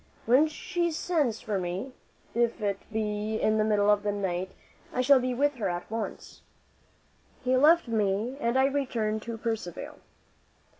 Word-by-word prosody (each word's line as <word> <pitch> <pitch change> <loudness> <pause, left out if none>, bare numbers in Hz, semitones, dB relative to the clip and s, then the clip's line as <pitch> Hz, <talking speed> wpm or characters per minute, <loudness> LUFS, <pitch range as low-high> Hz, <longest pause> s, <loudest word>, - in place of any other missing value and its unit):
When 260 +7 +5
she 345 +2 -2
sends 310 -8 0
for 205 -3 -2
me, 185 +8 -4 0.4
if 235 0 +1
it 200 -2 -1
be 215 0 -2
in 215 0 +2
the - - +4
middle 210 -1 +3
of 205 -1 +3
the 205 0 -1
night, 190 -2 -2 0.4
I 255 - 0
shall 270 +1 +6
be 250 0 -1
with 290 +3 +2
her 205 -5 -1
at 175 +3 -5
once." 225 0 -5 1.0
He 255 0 +2
left 305 +4 +5
me 215 +2 0
and 235 -1 +1
I 265 - +5
returned 240 -6 -1
to 230 +1 -6
Percivale. 220 -7 -4
225 Hz, 160 wpm, -28 LUFS, 205-260 Hz, 1.0 s, shall